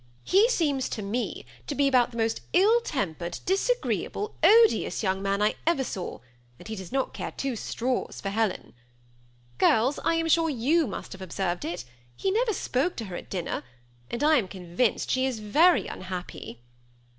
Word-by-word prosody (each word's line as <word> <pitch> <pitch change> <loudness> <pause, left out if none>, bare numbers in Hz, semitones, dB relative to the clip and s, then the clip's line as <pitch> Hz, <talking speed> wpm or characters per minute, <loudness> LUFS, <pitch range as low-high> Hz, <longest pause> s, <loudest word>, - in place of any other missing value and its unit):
He 410 +5 +4
seems 290 - +1
to 215 - -4
me 225 +5 -3 0.2
to 290 - -3
be 280 0 +3
about 255 -3 +4
the 235 - -10
most 225 0 0
ill 430 +7 +5
tempered, 175 - -3
disagreeable, 420 +1 0
odious, 450 - +5
young 190 -1 0
man 200 +1 0
I 210 - +3
ever 330 -6 +3
saw; 185 - -5 0.4
and - - -12
he 220 - -4
does 190 -3 -8
not 270 0 -1
care - - -4
two 270 -3 -3
straws 245 +3 -2
for 195 - -3
Helen. 210 -1 -1 0.9
Girls, 240 +6 +3
I 330 - +2
am 330 0 0
sure 325 0 +3
you 295 +4 +2
must 200 - -6
have 190 - -9
observed 180 -1 -2
it: 165 -8 -4 0.3
he 385 - -1
never 450 +2 +1
spoke 290 +1 -1
to 225 - -5
her 185 -3 -7
at - - -8
dinner, 180 -6 -3 0.5
and 235 - -3
I 310 0 +5
am 215 -7 0
convinced 185 +5 -1
she 260 0 +2
is 255 -3 -2
very 305 - +4
unhappy." 180 -10 -7
245 Hz, 180 wpm, -27 LUFS, 195-325 Hz, 0.9 s, ill